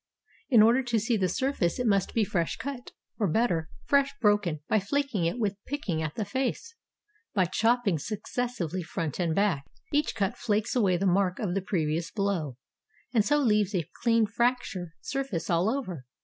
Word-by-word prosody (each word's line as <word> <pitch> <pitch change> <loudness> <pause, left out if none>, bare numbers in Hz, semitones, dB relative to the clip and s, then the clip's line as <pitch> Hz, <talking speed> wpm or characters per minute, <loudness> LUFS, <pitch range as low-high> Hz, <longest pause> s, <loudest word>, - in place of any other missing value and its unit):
In 230 -6 +7
order 235 +4 +5
to 240 -3 0
see 230 +3 +1
the 190 -4 +1
surface 260 -10 0
it 250 - -1
must 200 -4 +1
be 225 - +4
fresh 175 -4 -1
cut, 270 -3 -6 0.3
or 210 - +2
better, 170 -4 +1 0.2
fresh 280 -1 +3
broken 205 - +2
by 215 - +3
flaking 220 -2 -1
it 170 +8 0
with 205 -3 -2
picking 205 - -2
at 155 -1 -3
the 215 - -2
face; 265 - -2 0.6
by 190 -3 +4
chopping 225 -1 +2
suc 210 +7 -5
cessively 205 -10 -3
front 160 -1 -4
and 165 -3 +1
back, 195 -8 +2 0.3
each 295 +1 +1
cut 200 -2 0
flakes 215 +2 0
away 195 -7 +3
the 195 - -1
mark 185 0 +2
of 195 -5 -2
the 195 - 0
previous 165 -3 -1
blow, 180 - -2 0.6
and 225 -4 +4
so 295 +8 +2
leaves 210 -7 +2
a 170 -5 -1
clean 230 -2 +4
fracture 225 -7 -1
sur 275 0 -1
face 180 - -4
all 170 +4 +3
over. 185 - -4
205 Hz, 185 wpm, -28 LUFS, 175-240 Hz, 0.6 s, In